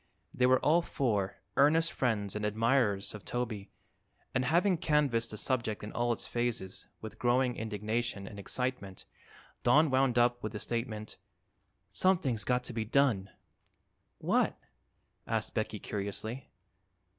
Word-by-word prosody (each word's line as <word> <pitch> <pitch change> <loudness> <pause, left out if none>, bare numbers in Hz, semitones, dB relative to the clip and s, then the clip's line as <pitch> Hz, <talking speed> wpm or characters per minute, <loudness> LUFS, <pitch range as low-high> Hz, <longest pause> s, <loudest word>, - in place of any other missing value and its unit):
They 125 - +3
were 130 0 +6
all 165 +4 +4
four 105 - -1
earnest 160 +4 +4
friends 105 -6 0
and 105 - -3
admirers 110 -1 +1
of 105 - -9
Toby 115 -5 -3 0.6
and 125 - +1
having 175 +6 +3
canvassed 140 -8 +2
the 105 - -6
subject 115 -3 -1
in 105 - -6
all 120 0 0
its 115 - -2
phases, 120 -6 -2
with 110 - -8
growing 125 0 +2
indignation 110 0 -2
and 100 0 -9
excitement, 100 -3 -3 0.6
Don 145 +4 +5
wound 130 -2 +3
up 120 0 +3
with 110 0 -4
the 105 - -4
statement: 110 -2 -4 0.7
"Something's 155 - +2
got 125 0 +1
to 125 - -5
be 115 -1 -1
done!" 110 -5 +2 0.9
"What?" - - +1 0.7
asked - - -1
Becky - - -2
curiously. 105 +5 -5
120 Hz, 135 wpm, -31 LUFS, 105-130 Hz, 0.9 s, were